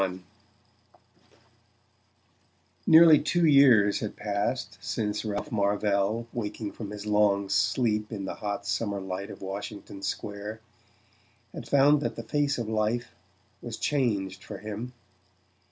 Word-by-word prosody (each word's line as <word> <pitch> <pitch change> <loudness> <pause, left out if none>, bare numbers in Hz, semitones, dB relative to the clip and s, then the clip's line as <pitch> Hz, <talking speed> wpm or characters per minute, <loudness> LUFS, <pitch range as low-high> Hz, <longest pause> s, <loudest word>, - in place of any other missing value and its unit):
XXXI 95 -1 -2 2.6
Nearly 160 -2 +8
two 170 +3 +1
years 125 -9 +6
had 105 - -5
passed 100 -1 -3
since 105 +2 -2
Ralph 105 -2 -4
Marvell, 105 +1 +1
waking 110 -2 -4
from 105 -3 -7
his 105 0 -7
long 105 -2 +2
sleep 105 +2 +1
in 100 -3 -4
the - - -4
hot 100 -1 -4
summer 100 -1 -1
light 95 +1 -5
of - - -10
Washington 100 0 -7
Square, 100 +2 -5 0.9
had - - -8
found 145 +1 +5
that - - -2
the 115 - -6
face 145 +4 0
of 120 -3 -3
life 110 +2 -1 0.5
was - - -6
changed 100 -10 -1
for 105 - -8
him. 110 +4 -6
105 Hz, 125 wpm, -27 LUFS, 100-120 Hz, 2.6 s, Nearly